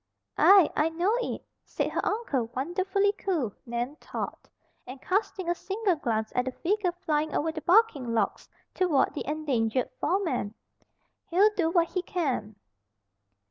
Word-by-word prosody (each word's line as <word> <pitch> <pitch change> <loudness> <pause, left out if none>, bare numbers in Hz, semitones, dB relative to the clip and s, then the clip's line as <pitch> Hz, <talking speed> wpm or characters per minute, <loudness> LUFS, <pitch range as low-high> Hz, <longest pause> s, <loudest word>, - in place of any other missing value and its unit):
"Aye, 390 -5 +7
I 305 +2 +2
know 350 +7 +1
it," - - -4 0.2
said - - -2
her - - -1
uncle, 295 - -1
wonderfully 375 +8 +1
cool, 305 - -1
Nan 240 +5 -3
thought, - - -6 0.4
and 260 +2 -8
casting 375 +1 -1
a 345 - +2
single 390 +2 -1
glance 220 -7 -2
at 250 - +1
the 260 - -2
figure 380 +3 0
flying 310 -3 -1
over 320 +2 0
the 315 0 -6
bucking 345 - +3
logs 220 -4 -1 0.2
toward 335 -8 +2
the - - -5
endangered 260 -6 0
foreman. 315 - -1 0.7
"He'll 400 +5 +4
do 330 -4 +1
what 335 0 +2
he 365 - -1
can." 270 - -2
325 Hz, 145 wpm, -28 LUFS, 255-375 Hz, 0.7 s, Aye